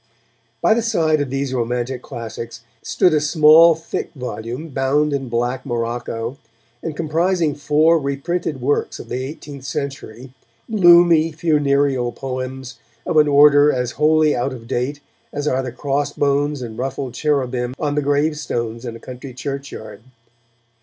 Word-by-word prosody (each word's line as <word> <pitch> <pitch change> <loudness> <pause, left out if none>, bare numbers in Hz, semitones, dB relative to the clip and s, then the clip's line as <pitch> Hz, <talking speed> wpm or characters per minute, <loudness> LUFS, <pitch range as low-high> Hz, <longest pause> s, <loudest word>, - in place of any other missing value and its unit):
By - - +5
the 235 - +1
side 160 -9 +1
of 140 - -2
these 135 0 -2
romantic 125 +1 -2
classics 115 0 -7 0.2
stood 180 - +2
a 150 - +2
small, 155 +2 +6
thick 165 +1 -5
volume, 125 +3 -6
bound 145 +2 +1
in 135 -3 -3
black 120 +2 -1
morocco, 120 0 -4 0.4
and 160 -2 -5
comprising 165 +1 0
four 150 +3 +3
reprinted 140 +1 -3
works 145 +4 0
of - - -10
the 130 +1 -3
eighteenth 140 0 -8
century, 130 -2 -6 0.4
gloomy, 170 -5 +6
funereal 140 -5 +1
poems 130 -1 -6 0.3
of - - 0
an 150 -1 +6
order 145 0 +6
as 125 -2 -2
wholly 155 +1 +3
out 130 +2 -1
of 115 -2 -10
date 135 +3 -2 0.3
as 145 +1 -3
are 130 -2 +1
the 130 -2 -5
crossbones 145 +1 -1
and 115 -1 -8
ruffled 135 -1 -4
cherubim 130 -4 -1
on 145 -2 -1
the 150 - 0
gravestones 140 -5 -1
in 115 -1 -5
a - - -10
country 130 +1 -9
churchyard. 140 -4 -7
140 Hz, 145 wpm, -20 LUFS, 125-150 Hz, 0.4 s, small